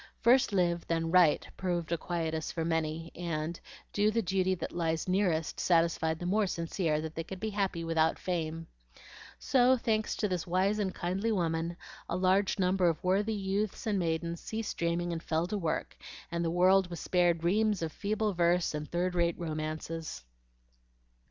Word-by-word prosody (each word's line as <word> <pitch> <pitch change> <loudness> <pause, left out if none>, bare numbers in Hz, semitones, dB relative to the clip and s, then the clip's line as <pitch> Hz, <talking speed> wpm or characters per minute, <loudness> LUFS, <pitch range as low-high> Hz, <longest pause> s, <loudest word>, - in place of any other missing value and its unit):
"First 245 +1 +4
live, 175 -3 +1
then 165 -1 0
write," 175 -4 +4
proved 175 -3 -2
a 170 - +2
quietus 160 -2 -2
for 165 -1 -2
many, 165 0 -1
and 165 -1 -3 0.3
"Do 210 +1 +3
the 230 +1 0
duty 190 0 +1
that - - -5
lies 165 -1 -1
nearest" 180 -4 0
satisfied 165 -2 +2
the 175 - -6
more 205 +3 +2
sincere 165 -2 -1
that 160 0 -5
they 165 - -4
could 190 +2 -8
be 220 +2 -3
happy 195 -4 -1
without 165 -1 +2
fame. 165 -2 -3 0.7
So, 255 0 +4
thanks 220 -2 0
to 210 - 0
this 180 -3 -3
wise 190 +4 +1
and 195 -3 0
kindly 190 +6 -1
woman, 170 -3 -1 0.3
a - - -1
large 190 +2 +2
number 185 -1 +3
of 160 - -3
worthy 200 +4 +1
youths 200 +2 -2
and 210 -3 +1
maidens 170 0 -2
ceased 220 -1 -4
dreaming 170 +1 0
and 165 - -4
fell 160 +1 0
to 210 +4 -2
work, 165 -4 -2 0.4
and 170 0 -1
the 165 - 0
world 185 +2 +4
was 170 - -6
spared 175 -2 +2
reams 205 +1 +2
of 160 - -2
feeble 210 +4 -1
verse 175 -1 +2
and 150 0 -4
third 180 +1 0
rate 170 -1 +1
romances. 155 - -4
175 Hz, 175 wpm, -31 LUFS, 165-195 Hz, 0.7 s, First